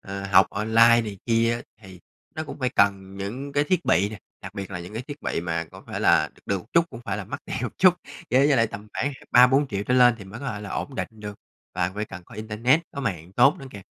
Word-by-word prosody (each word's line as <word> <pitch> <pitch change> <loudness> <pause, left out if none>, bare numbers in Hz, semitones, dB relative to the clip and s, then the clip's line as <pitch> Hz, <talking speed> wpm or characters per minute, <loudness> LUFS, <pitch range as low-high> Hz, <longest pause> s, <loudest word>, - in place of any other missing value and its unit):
ờ, 100 0 -6
học 95 -1 +6
online 115 +3 +4
này 105 -3 -7
kia 115 0 +2 0.2
thì 95 -3 -13 0.3
nó 155 - -4
cũng - - -9
phải 130 -2 0
cần 100 -2 +1
những 120 +9 -5
cái 145 +1 +2
thiết 180 +2 0
bị 95 +5 +3
nè, 110 -1 -9 0.2
đặc 100 0 -9
biệt 100 -2 -6
là 90 -2 -5
những 90 +3 -9
cái 110 +3 -4
thiết 145 0 -8
bị - - -2
mà 85 -1 -2
có - - -13
phải - - -5
là - - +4
được - - -24
được 95 -3 -1
chút, 170 0 +5
cũng 115 - -9
phải 100 -2 -2
là 105 - -5
mắc - - -6
tiền - - -5
một - - -5
chút. 185 -1 +6 0.4
Với 135 +3 +4
giờ 140 - +4
là 115 - +4
tầm 105 0 -9
khoảng 140 - -1
h - - -11
ba, 125 +1 +8
4.000.000 130 -6 +1
trở 125 - +1
lên 125 -2 +6
thì 100 - -10
mới 100 +5 -10
có 140 - -6
thể 105 -4 -5
là 105 -2 -8
ổn 140 - -4
định - - -3
được, 105 -2 -8 0.4
và 90 - 0
phải 105 +1 -2
cần 90 - -10
có - - -15
internet, 110 +7 +1
có 140 - -4
mạng 90 - -4
tốt 120 +7 +5
nữa 135 - -9
kìa. 100 -4 -10
110 Hz, 275 wpm, -24 LUFS, 100-125 Hz, 0.4 s, ba